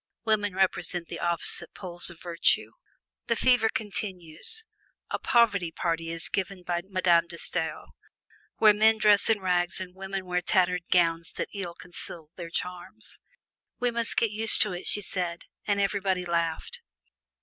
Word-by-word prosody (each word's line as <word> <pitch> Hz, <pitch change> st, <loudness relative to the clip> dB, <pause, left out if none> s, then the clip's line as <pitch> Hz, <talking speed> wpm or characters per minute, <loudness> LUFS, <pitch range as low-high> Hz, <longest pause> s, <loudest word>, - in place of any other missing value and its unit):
Women 205 Hz, -3 st, +1 dB
represent 180 Hz, -2 st, 0 dB
the -, -, -6 dB
opposite 170 Hz, -1 st, -1 dB
poles 175 Hz, -2 st, -2 dB
of 170 Hz, -1 st, -12 dB
virtue. 170 Hz, -1 st, +1 dB, 0.6 s
The 235 Hz, -, +2 dB
fever 245 Hz, -1 st, +4 dB
continues: 200 Hz, -, -2 dB, 0.5 s
a -, -, -1 dB
"poverty 205 Hz, -8 st, +3 dB
party" 165 Hz, 0 st, -2 dB
is 165 Hz, -1 st, +2 dB
given 190 Hz, -1 st, -3 dB
by 175 Hz, -1 st, -1 dB
Madame 175 Hz, -3 st, +3 dB
De 170 Hz, -, -9 dB
Stael, 165 Hz, -1 st, -2 dB, 0.7 s
where 215 Hz, -1 st, +7 dB
men 220 Hz, +1 st, +4 dB
dress 210 Hz, -1 st, +4 dB
in 220 Hz, -3 st, +2 dB
rags 180 Hz, -1 st, +1 dB
and 185 Hz, -1 st, -7 dB
women 190 Hz, 0 st, -5 dB
wear 180 Hz, 0 st, -1 dB
tattered 180 Hz, -1 st, +2 dB
gowns 165 Hz, -1 st, +2 dB
that -, -, -4 dB
ill 185 Hz, -4 st, -5 dB
conceal 165 Hz, -2 st, -10 dB
their 170 Hz, -2 st, -7 dB
charms. 175 Hz, -, -5 dB, 0.6 s
"We 245 Hz, 0 st, +1 dB
must 230 Hz, -1 st, +2 dB
get 230 Hz, -, +2 dB
used 220 Hz, +1 st, +5 dB
to 210 Hz, -3 st, -3 dB
it," 180 Hz, -, -5 dB
she 205 Hz, -, +2 dB
said, 175 Hz, -3 st, -3 dB, 0.2 s
and 205 Hz, -1 st, +1 dB
everybody 195 Hz, -2 st, 0 dB
laughed. 170 Hz, -, -1 dB
180 Hz, 155 wpm, -27 LUFS, 170-205 Hz, 0.7 s, where